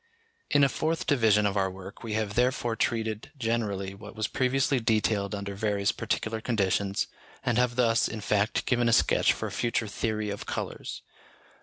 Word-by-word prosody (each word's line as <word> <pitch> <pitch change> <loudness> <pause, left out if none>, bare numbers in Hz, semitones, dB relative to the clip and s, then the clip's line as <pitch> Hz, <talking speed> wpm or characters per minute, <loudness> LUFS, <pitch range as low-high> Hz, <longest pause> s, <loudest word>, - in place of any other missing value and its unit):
In 145 - +4
a - - +7
fourth 160 +4 -1
division 110 -7 +4
of 100 0 +1
our 95 -1 +2
work 95 +1 -10
we 115 -2 -4
have 105 -1 -1
therefore 120 0 +1
treated 110 +1 -1
generally 110 -5 -1
what 100 +2 -11
was 110 -1 -1
previously 130 +1 +1
detailed 110 -2 +1
under 100 0 -5
various 100 0 0
particular 110 0 -2
conditions, 100 -3 0 0.4
and 125 -1 +2
have 125 -1 +2
thus, 115 -2 +3
in 110 - -5
fact, 105 +1 +1
given 120 -2 +2
a - - +3
sketch - - +4
for - - -3
a - - -4
future 120 -1 0
theory 105 0 -2
of 100 - -6
colours. - - -5
110 Hz, 175 wpm, -28 LUFS, 100-120 Hz, 0.4 s, a